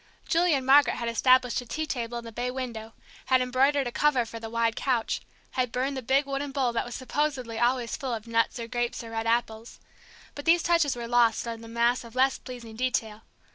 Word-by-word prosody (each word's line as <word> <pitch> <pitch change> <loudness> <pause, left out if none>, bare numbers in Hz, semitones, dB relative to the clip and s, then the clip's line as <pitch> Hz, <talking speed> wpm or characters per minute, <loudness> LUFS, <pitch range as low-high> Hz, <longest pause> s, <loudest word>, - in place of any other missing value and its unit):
Julie 340 -1 +3
and 265 -2 -2
Margaret 280 +2 +6
had 235 -1 -3
established 255 +1 +3
a - - -11
tea 315 +6 -3
table 240 -4 -3
in 235 - -6
the 230 - -8
bay 245 +3 -3
window, 235 -4 -6 0.3
had 260 -1 +4
embroidered 265 +3 +2
a 240 - -3
cover 265 -3 +2
for 230 0 -8
the 225 0 -7
wide 230 0 0
couch, 245 -4 -1 0.3
had 250 -2 -1
burned 265 +3 -1
the 260 - -3
big 270 +4 +2
wooden 275 +1 -3
bowl 265 -4 0
that 230 - -1
was 240 - -7
supposedly 260 -4 -2
always 240 0 +1
full 265 -5 -3
of 220 -1 -8
nuts 230 +1 +1
or 230 - -5
grapes 240 0 -2
or 225 - -9
red 225 0 -3
apples. 230 -1 -1 0.5
But 285 - -8
these 335 0 +4
touches 335 -6 +2
were 235 -1 -5
lost 235 -2 +3
in 230 -1 -5
the 230 - -10
mass 235 +2 +1
of 235 0 -13
less 265 +1 +2
pleasing 235 -3 -9
detail. 225 -3 -1
245 Hz, 220 wpm, -27 LUFS, 230-270 Hz, 0.5 s, Margaret